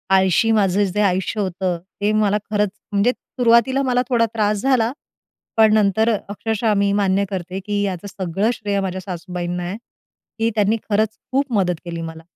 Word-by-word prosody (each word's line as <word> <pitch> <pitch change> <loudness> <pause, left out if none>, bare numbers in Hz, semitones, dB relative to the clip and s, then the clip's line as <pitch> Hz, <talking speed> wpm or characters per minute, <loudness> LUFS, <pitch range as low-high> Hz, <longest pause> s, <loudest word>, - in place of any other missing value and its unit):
आळशी 190 +4 +3
माझं 205 -2 +3
जे 200 +2 0
आयुष्य 190 +2 0
होतं 185 -2 -1 0.2
ते 205 +1 +2
मला 210 -1 +2
खरंच 210 -1 +2 0.2
म्हणजे 205 +4 +3
सुरुवातीला 245 +2 +2
मला 250 -1 +2
थोडा 235 -2 +3
त्रास 210 -1 +1
झाला, 250 -4 +2 0.7
पण 220 -1 +6
नंतर 220 +2 +3 0.2
अक्षरशः 220 +1 -1
मी 200 0 +2
मान्य 200 -1 +2
करते, 185 0 -4
की 205 +1 -2
याचं 195 -1 -3
सगळं 195 +3 -1
श्रेय 205 -3 -2
माझ्या 190 -1 -3
सासूबाईंना 180 -1 -4
आहे 180 +3 -4 0.6
कि 225 +1 +1
त्यांनी 210 0 +2
खरंच 215 +1 +1 0.2
खूप 275 0 0
मदत 185 -5 +2
केली 170 -1 -5
मला. 160 0 -7
205 Hz, 165 wpm, -20 LUFS, 190-220 Hz, 0.7 s, पण